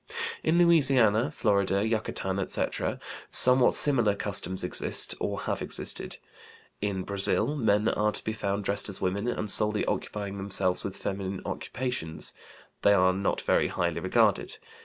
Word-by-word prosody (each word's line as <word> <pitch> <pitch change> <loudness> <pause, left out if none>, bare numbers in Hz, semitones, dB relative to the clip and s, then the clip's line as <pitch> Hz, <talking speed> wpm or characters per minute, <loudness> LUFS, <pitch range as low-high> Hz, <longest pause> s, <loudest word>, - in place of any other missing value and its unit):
In 160 +2 +1
Louisiana, 135 -10 +4
Florida, 100 -2 0
Yucatan, 105 -4 -3
etc., 95 - -2 0.3
somewhat 125 0 +6
similar 120 -8 +2
customs 95 -2 +1
exist 90 - +1
or - - -3
have - - -4
existed. - - -3 0.6
In 100 -2 -3
Brazil 100 +9 +1
men 105 -5 +1
are 105 0 0
to - - -4
be 110 - -3
found 100 -1 -3
dressed 100 +1 -1
as 100 - -6
women 100 +5 -2
and 115 -3 -3
solely 105 +1 +3
occupying 100 -1 -4
themselves 95 -2 0
with 100 -1 -6
feminine 95 -1 -5
occupations; 125 -11 -4 0.5
they 100 - +4
are 95 -1 +3
not 95 +1 -2
very - - +1
highly - - -2
regarded. - - 0
100 Hz, 140 wpm, -27 LUFS, 95-115 Hz, 0.6 s, somewhat